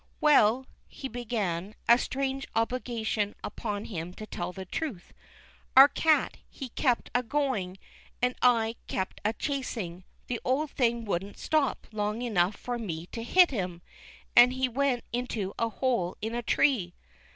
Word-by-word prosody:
" - - -38
Well," 260 -4 +5 0.2
he 270 - -7
began, 215 -6 -3
a 235 +1 +7
strange 270 0 -2
obligation 225 -3 -1
upon 210 -2 -4
him 175 -2 -6
to 215 - -7
tell 175 -4 -4
the 190 +1 -8
truth, 220 - -5 0.3
" - - -16
our 270 +1 +12
cat, 315 +1 +2
he 265 -3 -7
kept 245 0 0
a 245 - +3
going, 250 -9 -1 0.4
and 250 0 +2
I 230 -2 +3
kept 190 - -3
a 215 +2 +1
chasing; 230 - -4 0.2
the 245 - -3
old 280 +3 0
thing 235 -2 +1
wouldn't 195 0 -3
stop 305 -4 0
long 210 +2 -2
enough 200 -4 +1
for 245 +2 -4
me 170 -7 -4
to 230 - -5
hit 355 +9 +5
him, 180 -7 -3 0.5
and 245 +1 +8
he 260 0 +1
went 255 0 0
into 230 -5 -2
a 230 - +1
hole 230 -7 -1
in 220 +2 -3
a 240 - -1
tree." 235 -7 +2
230 Hz, 160 wpm, -29 LUFS, 200-255 Hz, 0.5 s, our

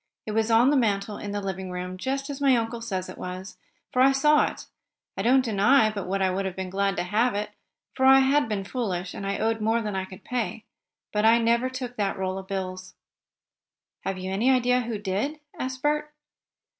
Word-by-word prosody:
It 215 - -4
was 220 +1 +1
on 235 +4 +5
the - - +3
mantel 205 -3 0
in 205 - -5
the 205 0 -2
living 190 -1 -4
room, 180 0 -5
just 270 +7 -3
as 280 0 -7
my 270 -2 +5
uncle 230 0 -3
says 190 -5 -3
it 185 - -10
was, 185 +2 -7 0.4
for 255 - +3
I 270 +1 +6
saw 300 +2 +4
it. - - -10 0.5
I - - -2
don't 260 +2 +4
deny 215 +2 +4
but 200 -4 -5
what 195 +1 0
I 190 - +2
would 190 +2 -1
have 190 -1 -3
been 190 -1 -5
glad 195 0 0
to 175 - -1
have 215 +5 +1
it, 205 +1 -3 0.4
for 265 0 +2
I 270 0 +8
had 275 -1 +2
been 205 -2 -2
foolish, 190 -5 -3
and 195 - -5
I 200 - -1
owed 225 0 0
more 225 +2 +2
than 210 -3 -3
I 190 0 -2
could 190 +1 -13
pay. 235 -3 -3 0.5
But 210 0 +1
I 225 +1 +7
never 235 +2 +2
took 255 -1 -6
that 200 -2 -1
roll 190 0 -2
of 190 - -10
bills." 185 -1 -5 1.1
"Have 195 - -2
you 185 0 -5
any 215 +7 +2
idea 250 -1 +3
who 230 -2 -3
did?" 205 +10 -2 0.2
asked 260 0 -4
Bert. 300 0 0
215 Hz, 220 wpm, -26 LUFS, 190-250 Hz, 1.1 s, I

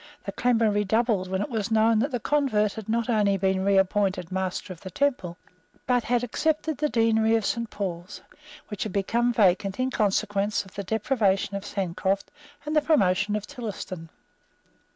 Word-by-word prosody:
The 200 - -3
clamour 230 -1 +2
redoubled 210 -1 +1
when 190 +1 -1
it - - -5
was 220 -2 -2
known 220 0 +3
that 265 +6 +1
the 250 -4 -2
convert 225 -7 +1
had 220 -2 -8
not 230 0 0
only 210 -4 +2
been 190 0 0
reappointed 195 -2 +1
Master 190 0 -3
of 165 - -17
the 190 - -7
Temple, 185 -6 -1 0.5
but 245 -2 +1
had 245 +1 +1
accepted 310 +4 -1
the 300 0 +1
Deanery 225 -2 +3
of 225 -3 0
Saint 230 -1 -1
Paul's, 180 -2 -5 0.5
which 210 -3 -6
had 215 - -3
become 235 +5 +1
vacant 195 -2 +2
in 260 +1 0
consequence 205 -1 0
of 190 - -16
the 200 - -4
deprivation 200 -2 0
of 200 - -4
Sancroft 195 0 -2 0.3
and 305 +1 -2
the 305 - +5
promotion 205 - +2
of 210 -1 -3
Tillotson. 190 -8 -7
210 Hz, 170 wpm, -26 LUFS, 195-235 Hz, 0.5 s, the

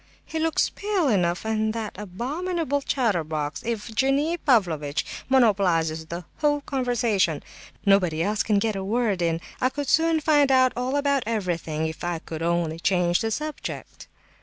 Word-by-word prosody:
He 320 - -4
looks 325 0 +1
pale 405 -6 0
enough; 180 -3 +1
and 220 0 0
that 220 -2 -4
abominable 285 - -2
chatterbox, 160 - -1
Evgenie 265 +8 0
Pavlovitch, 170 - +1 0.2
monopolizes 180 -10 +2
the 170 +1 -6
whole 295 -1 +2
of - - -9
the - - -14
conversation. 235 - +1 0.4
Nobody 180 -5 +3
else 210 +2 0
can 210 -2 +2
get 215 +1 0
a 195 - -3
word 210 -2 0
in. 165 -1 +1 0.2
I 255 - +3
could 285 +1 -4
soon 325 +2 +3
find 295 -3 +3
out 255 -1 +4
all 250 +3 -1
about 280 -1 +2
everything 170 -8 -2
if 160 0 -5
I 175 -1 -1
could 160 0 -7
only 165 -1 0
change 175 -1 +2
the 225 - 0
subject." 305 +7 -5
215 Hz, 160 wpm, -25 LUFS, 175-270 Hz, 0.4 s, out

